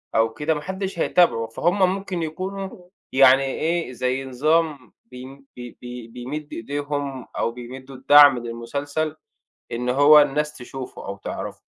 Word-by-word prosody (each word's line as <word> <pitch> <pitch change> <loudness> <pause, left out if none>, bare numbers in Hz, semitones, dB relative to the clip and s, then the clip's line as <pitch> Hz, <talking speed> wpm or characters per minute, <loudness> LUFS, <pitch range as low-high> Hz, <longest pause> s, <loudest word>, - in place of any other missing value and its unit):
أو 110 0 +2
كده، 150 +6 0
ما 150 - -4
حدّش 190 +1 -5
هيتابعه، 140 -13 +3
فهُم 175 - 0 0.2
ممكن 190 -4 -4
يكونوا 185 +2 -6 0.2
يعني 135 0 +6
إيه، 160 +2 -1
زي 130 +2 -2
نظام 145 0 0
بيم 130 +3 -12
بي 120 -1 -10
بي 125 -1 -8
بيمد 130 +6 -7
إيديهم 140 +1 -4
أو - - 0
بيمدّوا 130 +3 -10
الدعم 145 0 +7
للمسلسل، 140 +7 -4 0.6
إن 125 +1 -2
هو 145 +4 +7
الناس 150 +1 0
تشوفه 130 +1 -8
أو 100 0 -6
تعرفه، - - -6
140 Hz, 140 wpm, -23 LUFS, 125-155 Hz, 0.6 s, الدعم